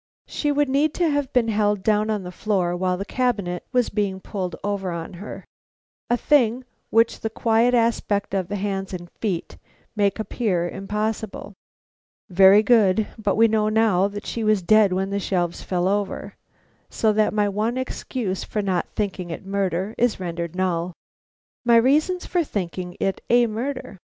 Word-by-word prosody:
_ - - - 0.2
She 295 - -1
would 290 0 +2
need 285 +3 +1
to 340 -3 +2
have 285 -2 -1
been 240 -3 +2
held 205 -2 +1
down 215 0 +2
on 210 -3 -1
the 180 - -7
floor 180 -2 -1
while 180 0 0
the 195 - -4
cabinet 205 -9 -1
was 250 -2 +2
being 200 -2 -1
pulled 185 -2 -4
over 200 -2 -2
on 170 +1 -5
her, 210 - -8 0.6
a 240 - +3
thing 250 -3 +2 0.3
which 225 +1 +3
the 220 - -3
quiet 230 +2 +2
aspect 225 -4 0
of 190 -3 0
the 205 - -4
hands 195 -1 -3
and 175 -1 -9
feet 190 -7 -3 0.4
make 200 -2 +1
appear 210 -5 -1
impossible. 210 +2 -4 0.8
(Very 195 +3 +7
good, 220 -3 +3
but 205 -2 0
we 230 +1 +5
know 215 -1 +1
now 215 -4 +3
that 205 +1 -7
she 230 - -3
was 215 -3 +2
dead 215 +1 +5
when 190 +1 -1
the 200 - 0
shelves 175 -3 -1
fell 180 -1 -1
over, 200 0 -2 0.6
so 220 -1 +1
that 215 0 +2
my 210 -1 +1
one 215 +5 -1
excuse 250 -6 -3
for 210 - -3
not 185 -3 0
thinking 195 -4 -3
it 165 - -6
a - - -15
murder 195 0 -1
is 240 -4 +2
rendered 170 -1 -4
null.) 180 -1 -1 0.7
_My 235 -1 +6
reasons 305 +9 +2
for 350 -1 0
thinking 180 - -5
it 195 - -1
a 240 0 +5
murder. 235 -1 -4
205 Hz, 175 wpm, -23 LUFS, 190-230 Hz, 0.8 s, Very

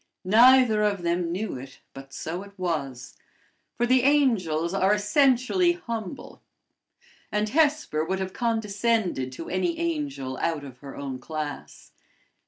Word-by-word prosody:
Neither 235 +2 +6
of 200 -4 0
them 170 0 0
knew 195 +3 -3
it, 135 +1 -11
but 135 0 -11
so 165 +6 -5
it 200 0 -13
was; 140 -8 -4 0.6
for 240 - +2
the 255 +1 +4
angels 210 - +2
are 195 +1 +3
essentially 260 - +3
humble, 230 - -7 0.9
and 210 0 0
Hesper 295 - +1
would 190 +3 -1
have 190 0 -4
condescended 220 - 0
to 165 - -8
any 185 - -1
angel 295 - -3
out 160 -3 -1
of 130 -3 -11
her 140 -1 -10
own 135 -2 -5
class. 150 +1 -7
200 Hz, 135 wpm, -26 LUFS, 155-245 Hz, 0.9 s, Neither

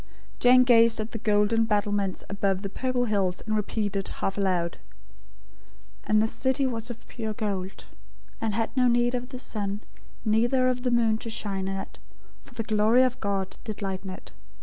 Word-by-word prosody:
Jane 255 +1 +7
gazed 230 -2 +5
at 215 +1 -4
the 225 - -5
golden 210 +1 +2
battlements 205 -3 0
above 200 -1 -1
the 195 - -3
purple 255 0 0
hills, 195 -5 0
and 215 -1 0
repeated, 205 -2 -1
half 195 - -3
aloud: 180 -4 0 1.3
"And 215 0 +3
the - - +2
city 265 +4 0
was 235 -2 -2
of 235 -1 -9
pure 220 -3 -5
gold; 195 -3 -4 0.6
and 220 -2 -1
had 225 +3 -1
no 255 -1 +4
need 240 0 +3
of 250 0 -3
the 260 - -7
sun, 205 -4 -4 0.4
neither 240 +4 +3
of 250 -1 0
the 250 - 0
moon 230 -2 +2
to 230 - -6
shine 195 -3 -2
in 195 0 -2
it: - - -8 0.4
for - - -18
the 225 - -2
glory 220 +3 +4
of 255 0 0
God 195 -2 -2
did 215 -1 -6
lighten 190 0 -4
it. 185 - -9
215 Hz, 180 wpm, -27 LUFS, 200-240 Hz, 1.3 s, Jane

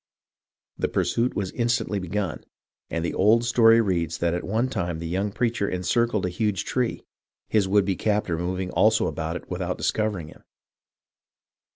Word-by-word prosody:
The - - +1
pursuit 120 +2 0
was 95 -2 -2
instantly 115 -3 0
begun, 90 -4 -3 0.5
and 85 0 -2
the - - -2
old 110 +5 +4
story 115 -1 +5
reads 85 -7 0
that 85 0 0
at 85 - -2
one 110 +6 0
time 85 -10 -2
the 85 +1 -5
young 95 +4 -1
preacher 115 -2 0
encircled 105 +4 0
a - - 0
huge 95 +1 -1
tree, 125 -3 -1 0.5
his 105 -3 +2
would 100 0 +3
be 95 -1 0
captor 105 -3 0
moving 90 +1 -2
also 110 +1 +3
about 80 +2 -3
it - - -7
without 90 0 -3
discovering 105 -8 -1
him. - - -16
100 Hz, 165 wpm, -25 LUFS, 90-110 Hz, 0.5 s, story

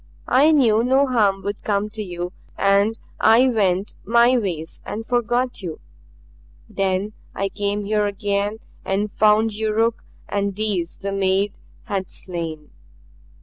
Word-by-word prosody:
I 285 +5 +5
knew 230 -7 +4
no 265 +3 +4
harm 210 -7 +1
would 205 +1 -4
come 205 0 0
to 215 0 -6
you, 180 -2 -5 0.2
and 200 +3 +3 0.2
I 235 +4 +6
went 195 -4 +1
my 235 +2 +4
ways 175 -9 -3
and 225 +2 -5
forgot 245 +1 0
you. 170 -4 -6 0.9
Then 195 +2 -1 0.2
I 195 0 -1
came 205 +1 -2
here 210 0 +1
again 205 +1 -1 0.3
and 200 +2 -1
found 215 +2 +3
Yuruk 220 +2 0 0.2
and 200 -1 -1
these 200 -5 -2
the 200 0 -4
maid 195 +1 0 0.2
had 195 -4 -3
slain." 165 -4 -6
205 Hz, 135 wpm, -22 LUFS, 195-225 Hz, 0.9 s, I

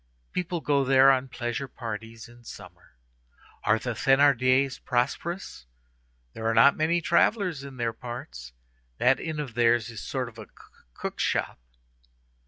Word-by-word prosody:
People 175 -2 -3
go 140 -2 +2
there 135 +1 +6
on 130 0 0
pleasure 120 +2 -4
parties 115 -2 -7
in 120 0 -18
summer. 90 - -13 0.7
Are 105 - +3
the 120 +2 -4
Thénardiers 135 +1 +3
prosperous? 130 - -2 0.7
There 110 - -4
are 115 - +1
not 135 +5 +6
many 170 +2 +1
travellers 175 -3 +1
in 135 -2 -10
their 115 -2 -1
parts. 90 - -8 0.5
That 125 - +3
inn 160 -2 -4
of 140 -6 -5
theirs 115 -1 +2
is 115 - -8
a - - -8
sort 130 -2 -3
of 115 -1 -12
a 110 - -9 0.5
cook - - -6
shop." - - -1
125 Hz, 150 wpm, -26 LUFS, 115-140 Hz, 0.7 s, there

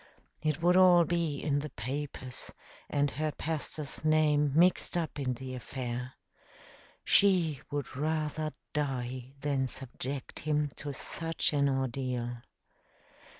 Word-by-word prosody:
It 155 +1 0
would 180 +1 +5
all 180 -2 +7
be 170 -4 0
in 145 0 +1
the 150 +1 -4
papers, 130 +2 -4 0.4
and 145 -1 +2
her 155 +1 -1
pastor's 155 -2 -3
name 150 -2 +4
mixed 175 +1 +4
up 165 -3 -2
in 130 -2 0
the 130 +1 -6
affair. 125 0 -4 0.9
She 175 -8 +4
would 145 -2 -3
rather 155 +1 -1 0.2
die 130 -3 -2
than 140 -2 +1
subject 130 +1 -5
him 150 -1 0
to 145 0 -4
such 165 +4 -1
an 140 -1 +3
ordeal. 125 -2 -1
145 Hz, 120 wpm, -31 LUFS, 130-155 Hz, 0.9 s, all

